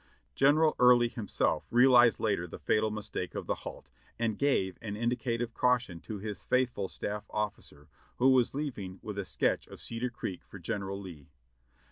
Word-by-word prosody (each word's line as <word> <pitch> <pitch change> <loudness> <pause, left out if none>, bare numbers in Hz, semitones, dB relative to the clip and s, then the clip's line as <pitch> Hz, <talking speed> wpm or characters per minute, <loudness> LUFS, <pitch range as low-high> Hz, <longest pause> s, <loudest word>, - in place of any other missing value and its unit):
General 150 +3 +4
Early 125 -1 +6
himself 110 -4 -1
realized 120 -1 +6
later 100 -5 0
the - - -8
fatal 110 +9 +1
mistake 105 -1 -4
of - - -4
the - - 0
halt, - - -9 0.3
and 115 -3 -1
gave 95 -10 +1
an 105 -3 -5
indicative 120 0 -1
caution 125 -9 +1
to 110 - -6
his 105 -1 -6
faithful 125 -6 +1
staff 105 +2 -4
officer, 100 -8 -5 0.3
who 130 +2 +4
was 130 -1 +3
leaving 105 -11 -4
with 105 -1 -5
a 100 - -3
sketch - - 0
of - - -12
Cedar 115 +2 -3
Creek 95 -6 -6
for - - -12
General 100 +2 -4
Lee. 85 -7 -10
110 Hz, 165 wpm, -30 LUFS, 100-125 Hz, 0.3 s, Early